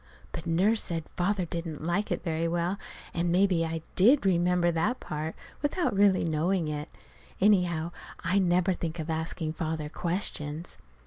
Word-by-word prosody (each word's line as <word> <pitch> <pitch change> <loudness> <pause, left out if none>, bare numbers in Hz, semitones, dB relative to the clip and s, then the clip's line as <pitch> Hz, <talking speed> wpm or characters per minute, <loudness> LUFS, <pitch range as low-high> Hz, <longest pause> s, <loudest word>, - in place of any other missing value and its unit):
But 165 - -6
Nurse 195 +7 +3
said 165 -2 -2
Father 185 +1 +1
didn't 165 -2 -5
like 195 +5 0
it - - -1
very 165 -1 0
well, 175 +4 -1 0.3
and 170 0 0
maybe 180 -2 +3
I 165 -1 -3
did 240 +7 +5
remember 175 -1 +3
that 205 +10 0
part, 155 +1 -4 0.3
without 295 - 0
really 195 -1 +4
knowing 165 +2 +1
it. 150 +1 -4 0.5
Anyhow, 180 -5 +3 0.3
I 180 +4 +2
never 180 0 +3
think 170 -1 -4
of 160 0 -3
asking 160 0 -2
Father 160 -2 -3
questions. 165 -2 -3
170 Hz, 150 wpm, -29 LUFS, 160-190 Hz, 0.5 s, did